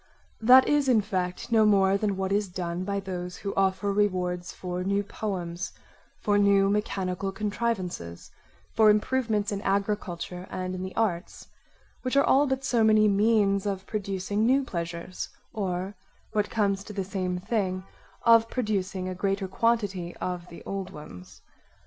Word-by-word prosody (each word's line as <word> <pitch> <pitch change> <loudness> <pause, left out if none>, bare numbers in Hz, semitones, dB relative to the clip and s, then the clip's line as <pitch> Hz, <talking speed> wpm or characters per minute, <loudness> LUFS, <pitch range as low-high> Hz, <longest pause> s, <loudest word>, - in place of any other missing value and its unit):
That 255 +4 +7
is, 290 -2 +2
in 230 -4 +5
fact, 185 +2 -3
no 220 -1 +5
more 195 -2 +4
than 200 -1 0
what 190 0 -2
is 200 -1 +1
done 175 0 -3
by 200 +1 -1
those 180 -2 -5
who 200 - -1
offer 195 +1 +1
rewards 180 -3 0
for 180 0 -4
new 200 +2 +1
poems, 185 -3 -4 0.4
for 205 -1 +1
new 200 -1 +4
mechanical 195 -2 -1
contrivances, 195 - -3 0.4
for 220 -1 +6
improvements 215 -1 +1
in 200 -1 -3
agriculture 195 -3 -2
and 185 0 -4
in 185 - -4
the 185 0 -6
arts; 190 -6 -2 0.5
which 255 +1 -1
are 280 - +6
all 285 +2 +4
but 265 0 -1
so 240 -3 +2
many 215 -1 +5
means 205 -1 +3
of 195 -1 -3
producing 200 0 -2
new 265 +4 +4
pleasures, 170 -3 -5 0.2
or 190 -2 -2 0.4
what 210 -1 0
comes 200 -3 0
to 210 - -8
the 195 -1 -2
same 185 -1 -2
thing, 185 -2 -1 0.4
of 230 -1 +6
producing 195 -6 -2
a 185 - -3
greater 195 +1 -1
quantity 195 -4 0
of 180 -1 -4
the 170 - -11
old 195 -2 -4
ones. 150 - -12
195 Hz, 155 wpm, -27 LUFS, 185-215 Hz, 0.5 s, That